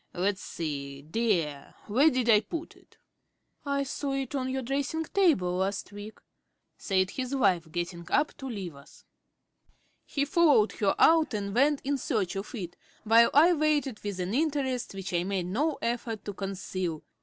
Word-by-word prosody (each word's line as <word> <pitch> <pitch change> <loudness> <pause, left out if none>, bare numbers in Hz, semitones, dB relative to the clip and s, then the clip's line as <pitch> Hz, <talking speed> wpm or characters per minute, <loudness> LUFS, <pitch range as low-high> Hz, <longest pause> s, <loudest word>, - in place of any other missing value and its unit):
Let's 190 +2 0
see, 140 -3 -5
dear; 160 -6 -1
where 260 +9 +4
did 255 -4 -1
I 215 -3 +7
put 320 +10 -6
it?" - - -24 0.7
"I 280 -1 0
saw 275 0 -3
it 270 -1 -3
on 260 -2 -1
your 265 0 -2
dressing 280 +5 -1
table 290 - +2
last 195 +2 -2
week," 205 +1 -9 0.6
said 190 -1 0
his 260 +1 -3
wife, 180 -10 +2
getting 170 0 -4
up 300 0 +1
to 270 - -7
leave 195 -8 -5
us. 140 +1 -17 1.0
He 280 -1 -1
followed 290 - +4
her 200 -2 0
out 320 -7 +4
and 200 -1 -3
went 280 +4 +3
in 280 0 -1
search 210 - -1
of 195 +5 -5
it, 175 -6 -6 0.3
while 230 +1 +6
I 325 +5 +6
waited 295 -6 0
with 200 -2 -4
an 180 +3 -2
interest 265 -6 -1
which 190 -2 -5
I 175 0 +1
made 190 -1 -2
no 280 - 0
effort 230 -2 -2
to 205 - -4
conceal. 185 -4 -4
220 Hz, 165 wpm, -28 LUFS, 185-275 Hz, 1.0 s, I